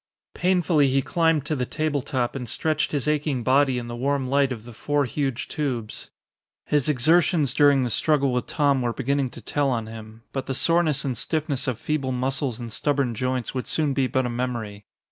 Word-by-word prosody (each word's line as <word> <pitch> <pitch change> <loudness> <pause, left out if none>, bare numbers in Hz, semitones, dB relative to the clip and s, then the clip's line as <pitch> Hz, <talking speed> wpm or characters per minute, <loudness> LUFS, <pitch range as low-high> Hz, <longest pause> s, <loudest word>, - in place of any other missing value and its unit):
Painfully 175 -5 +2
he 135 +1 +1
climbed 165 -3 +1
to 155 - -1
the 130 - -1
table 155 -2 -1
top 125 -1 -2
and 125 -4 -5
stretched 155 +5 0
his 145 -1 -1
aching 150 -4 0
body 130 +1 +3
in 120 -1 -4
the 120 - -5
warm 135 +2 -1
light 140 0 +2
of 115 -4 -5
the 120 - -10
four 145 +5 0
huge 135 +1 -2
tubes. 125 -8 -4 0.6
His 150 -1 +1
exertions 150 +1 +3
during 145 -2 +4
the 125 - -1
struggle 140 +1 +2
with 125 - -1
Tom 140 -3 +2
were 120 -1 -1
beginning 140 +1 0
to 120 - -12
tell 145 +2 0
on 115 -3 -1
him. 110 0 -10
But 135 - -3
the 135 - -2
soreness 165 -2 +2
and 130 -2 -1
stiffness 145 +2 -1
of 125 -4 -1
feeble 135 -1 -2
muscles 130 -1 -1
and 120 -2 -6
stubborn 140 -4 0
joints 125 +1 -2
would 130 -1 -4
soon 150 -3 0
be 135 -1 +1
but 130 -1 0
a - - -1
memory. 120 -4 -4
135 Hz, 200 wpm, -24 LUFS, 125-145 Hz, 0.6 s, during